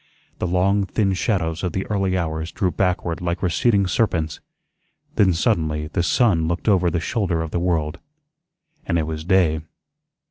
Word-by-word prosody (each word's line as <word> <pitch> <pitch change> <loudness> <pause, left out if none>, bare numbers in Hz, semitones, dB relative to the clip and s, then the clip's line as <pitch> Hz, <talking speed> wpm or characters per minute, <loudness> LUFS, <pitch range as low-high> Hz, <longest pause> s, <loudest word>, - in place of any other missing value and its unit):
The 90 - -1
long, 95 +3 +2
thin 95 0 +1
shadows 90 -5 -1
of 90 -4 -2
the 95 - -2
early 95 -3 0
hours 80 -1 -3
drew 90 -2 0
backward 90 -3 -1
like 85 +1 -2
receding 100 +3 +2
serpents, 85 -5 0 0.8
then 95 -2 +4
suddenly 80 -5 0
the 85 - -1
sun 85 -3 +2
looked 85 +5 -3
over 95 -4 +4
the 85 +1 -1
shoulder 90 -4 -1
of 80 - -6
the 85 - -1
world, 85 -2 -1 0.9
and 85 - +1
it 80 - 0
was 80 0 -5
day. 85 -4 +2
90 Hz, 165 wpm, -22 LUFS, 80-95 Hz, 0.9 s, then